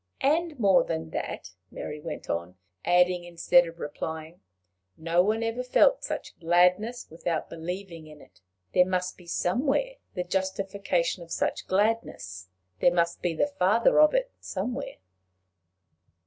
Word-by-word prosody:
"And 315 +2 +2
more 195 -4 +5
than 80 0 -4
that," - - -5 0.2
Mary 150 - -6
went - - -7
on, 85 +2 -3 0.3
adding 180 0 +3
instead 175 0 +3
of 165 +1 -10
replying, 160 +3 -6 0.6
"no 165 +2 +2
one 215 +4 +1
ever 225 +2 -1
felt 375 - +4
such - - -5
gladness 180 +7 +2
without 165 0 -3
believing 170 0 -6
in 150 -1 -13
it. - - -19 0.3
There 180 - +6
must 185 0 -1
be 175 - -17
somewhere 275 - 0 0.2
the 180 - -1
justification 190 -1 -1
of 170 - -11
such - - -1
gladness. 185 - -1 0.3
There 175 - +5
must 170 -1 0
be 175 -2 -1
the - - +2
father 220 +9 +4
of 305 +6 +6
it - - +1
somewhere." 245 +8 -4
180 Hz, 140 wpm, -27 LUFS, 165-220 Hz, 0.6 s, There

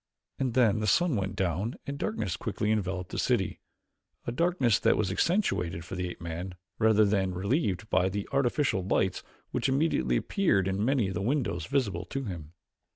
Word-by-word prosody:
And 130 -3 -1
then 110 -5 +4
the 105 - -1
sun 170 - +3
went 95 -1 -2
down 95 +5 -1
and 140 0 -5
darkness 105 - -2
quickly 105 +2 -2
enveloped 95 -4 -2
the - - -3
city - - 0 0.7
a - - -2
darkness 130 - +2
that - - +3
was 100 -3 0
accentuated 95 - 0
for - - -9
the 90 -1 -2
ape - - -9
man 85 +2 -5 0.2
rather 110 -1 +5
than 95 -3 +1
relieved 100 - 0
by 95 +1 +3
the 100 +1 -4
artificial 135 -6 +1
lights 95 0 0 0.3
which 125 +1 0
immediately 130 - +2
appeared 105 - +1
in 95 +2 0
many 120 -5 +2
of - - -4
the 100 - -2
windows 115 - -1
visible 130 -7 0
to 135 0 -4
him. 85 - -7
105 Hz, 180 wpm, -29 LUFS, 95-130 Hz, 0.7 s, rather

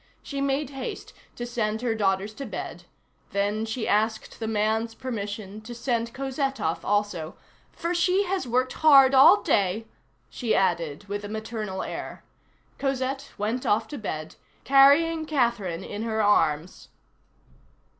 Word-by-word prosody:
She 280 -1 -4
made 275 0 0
haste 270 -2 -6 0.2
to 240 - -5
send 225 -2 -2
her 235 -2 +1
daughters 200 -1 0
to 275 +5 -7
bed, - - -6 0.5
then 205 +2 0
she 220 +1 -3
asked 220 +1 0
the 225 - -3
man's 220 +1 0
permission 210 -4 -5
to 240 +2 -9
send 235 -1 -1
Cosette 270 +1 -2
off 160 +1 -2
also; 200 -5 -1 0.4
"for 340 +1 -3
she 365 +3 +2
has 375 -7 -2
worked 255 +2 +1
hard 275 -4 +6
all 325 +10 +7
day," 210 - +1 0.4
she 235 -4 -1
added 170 -4 0
with 205 +1 -4
a 205 - -6
maternal 215 -3 -4
air. - - -6 0.6
Cosette 270 0 -2
went 220 +4 -2
off 220 +2 +1
to 290 - -6
bed, 155 -7 -5 0.3
carrying 305 +4 +5
Catherine 235 - 0
in 205 +2 -6
her 220 -1 0
arms. 165 -5 +1
225 Hz, 145 wpm, -26 LUFS, 205-270 Hz, 0.6 s, all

